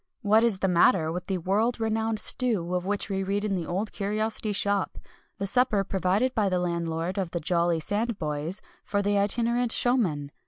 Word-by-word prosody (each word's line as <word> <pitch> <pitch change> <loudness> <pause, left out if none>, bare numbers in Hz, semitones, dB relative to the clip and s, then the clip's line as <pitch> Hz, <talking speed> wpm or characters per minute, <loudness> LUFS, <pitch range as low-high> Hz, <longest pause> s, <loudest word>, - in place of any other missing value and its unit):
What 215 +2 +4
is 230 -5 +3
the 190 - 0
matter 170 -2 +3
with 180 +1 -5
the 190 - -1
world 210 +8 0
renowned 225 0 -1
stew 210 -7 +1
of 180 0 -2
which 205 0 -1
we 195 -1 -2
read 200 +2 -1
in 205 - -1
The 175 -4 -3
Old 195 +5 -2
Curiosity 215 +1 -1
Shop 200 -1 0 0.4
the 200 - -3
supper 220 -1 +2
provided 195 +6 0
by 210 -3 +1
the 185 - 0
landlord 170 +1 -2
of 185 -3 -2
the 170 - -3
"Jolly 170 0 +1
Sandboys" 180 -4 -2 0.2
for 205 -1 -1
the 205 0 +1
itinerant 235 +3 +1
showmen? 180 - +1
200 Hz, 185 wpm, -26 LUFS, 180-220 Hz, 0.4 s, What